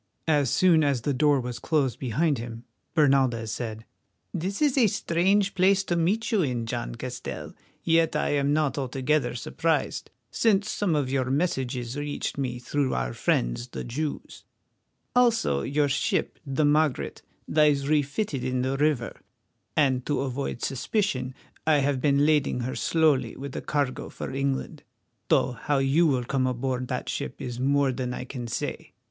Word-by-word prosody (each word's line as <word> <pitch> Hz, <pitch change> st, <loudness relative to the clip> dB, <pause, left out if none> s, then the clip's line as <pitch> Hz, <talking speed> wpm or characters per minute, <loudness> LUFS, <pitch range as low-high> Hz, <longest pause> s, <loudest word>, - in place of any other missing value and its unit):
As 145 Hz, -4 st, +3 dB
soon 170 Hz, 0 st, +4 dB
as 140 Hz, -4 st, +1 dB
the 140 Hz, +4 st, 0 dB
door 145 Hz, +1 st, +3 dB
was 125 Hz, -1 st, -5 dB
closed 135 Hz, -7 st, 0 dB
behind 140 Hz, +3 st, 0 dB
him, 115 Hz, 0 st, -7 dB, 0.3 s
Bernaldez 135 Hz, -7 st, +3 dB
said: 110 Hz, -1 st, -5 dB, 0.5 s
"This 190 Hz, +5 st, -3 dB
is 295 Hz, -4 st, +3 dB
a 250 Hz, -5 st, +5 dB
strange 195 Hz, +3 st, +1 dB
place 195 Hz, +1 st, +3 dB
to 175 Hz, -, -1 dB
meet 185 Hz, +7 st, +1 dB
you 215 Hz, -4 st, +3 dB
in, 125 Hz, -7 st, -1 dB
John -, -, -4 dB
Castell, -, -, -6 dB, 0.3 s
yet 165 Hz, -1 st, +3 dB
I 150 Hz, -, +1 dB
am 140 Hz, -1 st, +1 dB
not 150 Hz, -1 st, +1 dB
altogether 135 Hz, +1 st, 0 dB
surprised, 160 Hz, +5 st, -1 dB, 0.2 s
since 215 Hz, -2 st, +2 dB
some 190 Hz, -6 st, 0 dB
of 140 Hz, -3 st, 0 dB
your 130 Hz, -2 st, 0 dB
messages 130 Hz, -5 st, -1 dB
reached 145 Hz, 0 st, -3 dB
me 130 Hz, -3 st, -2 dB
through 135 Hz, +2 st, -1 dB
our 60 Hz, -1 st, -2 dB
friends -, -, 0 dB
the -, -, -6 dB
Jews; 145 Hz, +5 st, -5 dB, 0.7 s
also 230 Hz, -, +3 dB
your 145 Hz, -, +1 dB
ship, 135 Hz, -, -1 dB
the 135 Hz, +3 st, +1 dB
Margaret, 150 Hz, -1 st, +1 dB, 0.3 s
lies 145 Hz, -2 st, +3 dB
refitted 145 Hz, -, 0 dB
in 130 Hz, 0 st, -1 dB
the 135 Hz, +1 st, -1 dB
river, 145 Hz, -5 st, 0 dB, 0.6 s
and 130 Hz, -4 st, +3 dB
to 145 Hz, -, 0 dB
avoid 135 Hz, -2 st, -3 dB
suspicion 130 Hz, -, -1 dB, 0.3 s
I 155 Hz, -2 st, +5 dB
have 140 Hz, -2 st, +1 dB
been 140 Hz, 0 st, +3 dB
lading 150 Hz, -5 st, +2 dB
her 125 Hz, +2 st, -3 dB
slowly 155 Hz, -5 st, +2 dB
with 140 Hz, 0 st, -7 dB
a -, -, -3 dB
cargo 145 Hz, -3 st, -2 dB
for -, -, -6 dB
England, 135 Hz, 0 st, -2 dB, 0.5 s
though -, -, +3 dB
how 130 Hz, +4 st, -1 dB
you 135 Hz, +5 st, +3 dB
will 130 Hz, -4 st, +1 dB
come 130 Hz, +1 st, 0 dB
aboard 125 Hz, 0 st, -2 dB
that -, -, -3 dB
ship -, -, -4 dB
is 120 Hz, -1 st, -5 dB
more 140 Hz, +1 st, +2 dB
than 125 Hz, -1 st, -3 dB
I -, -, -5 dB
can 125 Hz, -2 st, -6 dB
say. 115 Hz, -, -4 dB
140 Hz, 165 wpm, -26 LUFS, 125-155 Hz, 0.7 s, a